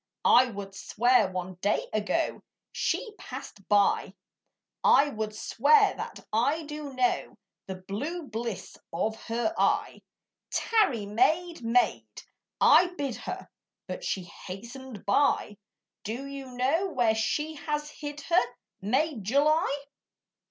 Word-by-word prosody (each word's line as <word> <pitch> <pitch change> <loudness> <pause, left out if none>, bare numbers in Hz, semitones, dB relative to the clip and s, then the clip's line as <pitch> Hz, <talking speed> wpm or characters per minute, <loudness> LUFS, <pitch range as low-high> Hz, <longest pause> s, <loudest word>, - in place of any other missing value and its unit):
I 255 +1 +7
would 200 -3 -7
swear 230 +1 +2
one 185 0 -5
day 205 +1 +1
ago 215 +10 0 0.3
She 455 - -1
passed 195 - -9
by, 205 -1 +3 0.7
I 285 +1 +6
would 215 -4 -4
swear 420 - +4
that - - -7
I 280 +9 +2
do 300 -1 -6
know 255 -1 0 0.3
The 190 - -4
blue 220 - -4
bliss 225 -3 -5
of 215 +6 -1
her 240 +8 -1
eye: - - +1 0.5
"Tarry, 385 - +2
maid, 315 - +1
maid," 235 +2 +1 0.4
I 360 0 +6
bid 275 -5 -2
her; - - -6 0.4
But - - -6
she 190 - -2
hastened 230 +6 -9
by. 205 -1 +2 0.5
Do 235 +6 -4
you 275 -1 -7
know 260 +9 +1
where 245 -10 +2
she 220 +8 -1
has 300 0 -3
hid 295 0 -7
her, 320 -3 +3 0.4
Maid 260 +3 0
July? 285 - +2
250 Hz, 125 wpm, -28 LUFS, 210-300 Hz, 0.7 s, I